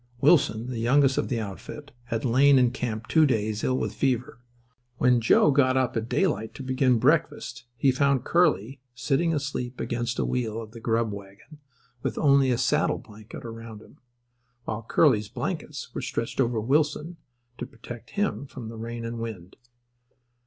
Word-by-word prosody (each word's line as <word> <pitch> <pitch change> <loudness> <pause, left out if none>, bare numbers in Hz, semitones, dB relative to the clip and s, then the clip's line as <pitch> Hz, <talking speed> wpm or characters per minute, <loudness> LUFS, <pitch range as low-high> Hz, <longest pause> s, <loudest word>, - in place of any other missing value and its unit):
Wilson, 130 -6 +3
the 120 - -4
youngest 135 +3 +3
of - - -1
the 120 -3 -1
outfit, 110 +8 -8
had 115 0 -3
lain 135 +3 +5
in 125 -2 +4
camp 115 -3 -4
two 155 +4 +4
days, 110 -4 -1
ill 130 - +1
with - - -2
fever. 125 -3 -1 0.6
When 125 -2 +3
Joe 120 +5 +5
got 130 -2 +3
up 130 -2 0
at 115 +1 -2
daylight 150 - 0
to 135 - -7
begin 130 -1 +2
breakfast 145 -2 0
he 135 - +3
found 140 0 +2
Curly 140 - +1
sitting 145 +6 +1
asleep 135 -4 -3
against 120 0 -2
a - - 0
wheel 115 -3 -2
of 110 -1 -8
the 115 - -10
grub 115 -1 0
wagon 100 +9 -12 0.4
with - - -3
only 140 -2 +4
a 125 - +2
saddle 150 +5 +1
blanket 110 +1 -12
around 115 -1 -8
him, - - -20 0.7
while 110 +1 -3
Curly's 110 -3 +2
blankets - - -5
were - - -4
stretched 115 +3 -2
over 120 -2 +1
Wilson 150 +7 0 0.4
to - - -4
protect 115 0 -11
him 140 - -1
from 120 -4 -8
the 115 - -9
rain 115 +1 -6
and 115 0 -5
wind. 100 -6 -7
120 Hz, 170 wpm, -26 LUFS, 115-140 Hz, 0.7 s, lain